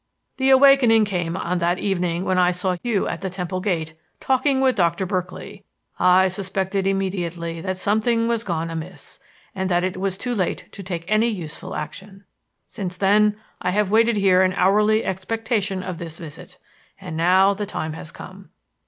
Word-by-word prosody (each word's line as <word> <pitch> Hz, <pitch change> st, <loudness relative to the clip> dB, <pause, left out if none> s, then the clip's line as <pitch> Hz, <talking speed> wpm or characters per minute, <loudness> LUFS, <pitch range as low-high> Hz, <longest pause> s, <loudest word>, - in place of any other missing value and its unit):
"The 265 Hz, 0 st, +2 dB
awakening 265 Hz, -5 st, +6 dB
came 175 Hz, -4 st, -2 dB
on 180 Hz, 0 st, -2 dB
that 175 Hz, +1 st, +1 dB
evening 180 Hz, -3 st, -1 dB
when 185 Hz, -1 st, +1 dB
I 180 Hz, -1 st, +4 dB
saw 180 Hz, +1 st, -1 dB
you 230 Hz, -5 st, 0 dB
at 170 Hz, -, -4 dB
the 190 Hz, -, -3 dB
Temple 180 Hz, 0 st, -4 dB
gate 165 Hz, -5 st, -2 dB, 0.3 s
talking 265 Hz, +1 st, +1 dB
with 265 Hz, -1 st, +3 dB
Doctor 175 Hz, -1 st, +1 dB
Berkeley. 185 Hz, +2 st, -5 dB, 0.4 s
I 180 Hz, +1 st, +5 dB
suspected 190 Hz, +1 st, -2 dB
immediately 175 Hz, -4 st, -2 dB
that 185 Hz, +1 st, -3 dB
something 220 Hz, +4 st, +1 dB
was 230 Hz, -1 st, 0 dB
gone 165 Hz, -4 st, -3 dB
amiss 165 Hz, +3 st, -8 dB, 0.3 s
and 190 Hz, -1 st, -2 dB
that 175 Hz, 0 st, +2 dB
it 185 Hz, 0 st, -2 dB
was 190 Hz, 0 st, -2 dB
too 245 Hz, +3 st, -3 dB
late 190 Hz, -6 st, -2 dB
to 200 Hz, -, -9 dB
take 175 Hz, -3 st, -5 dB
any 215 Hz, +3 st, +3 dB
useful 175 Hz, -9 st, -5 dB
action. 195 Hz, +6 st, -8 dB, 0.4 s
Since 185 Hz, -5 st, -6 dB
then, 210 Hz, +2 st, +3 dB, 0.2 s
I 180 Hz, -, 0 dB
have 200 Hz, +1 st, 0 dB
waited 225 Hz, 0 st, +4 dB
here 190 Hz, -2 st, +4 dB
in 185 Hz, 0 st, +2 dB
hourly 210 Hz, +4 st, +3 dB
expectation 200 Hz, 0 st, -2 dB
of 180 Hz, -3 st, -5 dB
this 165 Hz, -2 st, -7 dB
visit. 175 Hz, +3 st, -11 dB, 0.4 s
And 180 Hz, -4 st, -7 dB
now 185 Hz, +4 st, +4 dB
the 205 Hz, +1 st, -4 dB
time 155 Hz, -5 st, -4 dB
has 160 Hz, 0 st, -8 dB
come. 190 Hz, +2 st, -12 dB
190 Hz, 175 wpm, -22 LUFS, 180-210 Hz, 0.4 s, awakening